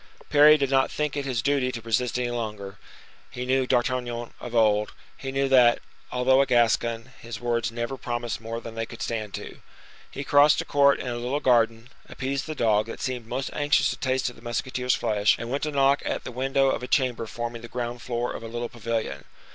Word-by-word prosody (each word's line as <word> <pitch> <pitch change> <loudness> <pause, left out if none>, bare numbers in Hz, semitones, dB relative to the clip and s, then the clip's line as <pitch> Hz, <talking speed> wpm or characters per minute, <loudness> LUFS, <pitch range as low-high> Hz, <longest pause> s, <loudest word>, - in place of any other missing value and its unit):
Parry 150 +1 +8
did 140 -2 -1
not 135 -1 +3
think 150 -2 -2
it 140 -1 -2
his 125 -4 -1
duty 140 -2 +1
to 120 - -5
resist 115 +2 -1
any 125 -1 -1
longer; 105 -4 -5 0.5
he 125 - -5
knew 130 0 +1
D'Artagnan 120 -2 -1
of 120 -1 -7
old; 105 -2 +3 0.2
he 135 - -6
knew 135 0 +1
that, 125 -3 +6 0.3
although 130 +2 +4
a 140 - +1
Gascon, 115 -1 +1
his 115 -2 -7
words 120 -1 -1
never 120 +3 -4
promised 120 -2 -4
more 115 +1 -5
than 115 -1 -9
they 115 0 -4
could 120 - -7
stand 110 -3 -3
to. - - -9 0.5
He 140 - -6
crossed 145 +1 +5
a - - -2
court 140 -1 +4
and 125 - -4
a 120 0 -3
little 125 +4 -1
garden, 115 -2 +2 0.2
appeased 140 +2 -3
the 155 - -4
dog, 110 -3 +2
that 115 - -7
seemed 125 -4 -4
most 135 +3 -3
anxious 145 0 +2
to - - -4
taste 130 0 -1
of - - -17
the - - -16
musketeer's 125 +1 -1
flesh, 105 -1 +2
and 115 +1 -6
went 140 - -1
to 150 - -2
knock 140 0 +3
at - - -3
the - - -6
window 135 +2 +1
of - - -2
a 125 - -5
chamber 125 -5 +1
forming 120 +1 -5
the 120 - -8
ground 120 0 -4
floor 120 -1 -2
of - - -7
a 115 - -7
little 120 +1 -4
pavilion. 115 -1 -4
120 Hz, 220 wpm, -25 LUFS, 115-135 Hz, 0.5 s, Parry